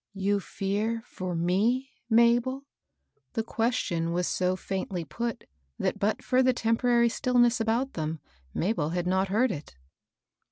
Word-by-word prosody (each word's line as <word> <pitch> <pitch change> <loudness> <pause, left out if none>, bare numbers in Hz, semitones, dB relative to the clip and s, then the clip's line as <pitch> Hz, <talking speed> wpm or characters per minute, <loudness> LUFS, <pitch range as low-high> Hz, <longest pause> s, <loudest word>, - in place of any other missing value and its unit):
" - - -60
You 205 0 +3
fear 210 +4 -2
for 185 -5 -5
me, 215 +10 +1 0.2
Mabel? 240 +4 +3 0.3
" - - -47
The 225 -3 -1
question 220 -8 -1
was 180 +1 0
so 185 +1 +1
faintly 185 -2 -4
put 230 +10 -4 0.3
that, - - -1
but 210 +2 0
for 255 0 +3
the 255 0 +4
temporary 235 +1 +3
stillness 240 -1 +2
about 235 +5 0
them, 155 0 -3 0.3
Mabel 170 - 0
had 175 +1 -2
not 190 +2 +1
heard 225 +6 +2
it. 145 - -7
220 Hz, 150 wpm, -28 LUFS, 180-240 Hz, 0.3 s, the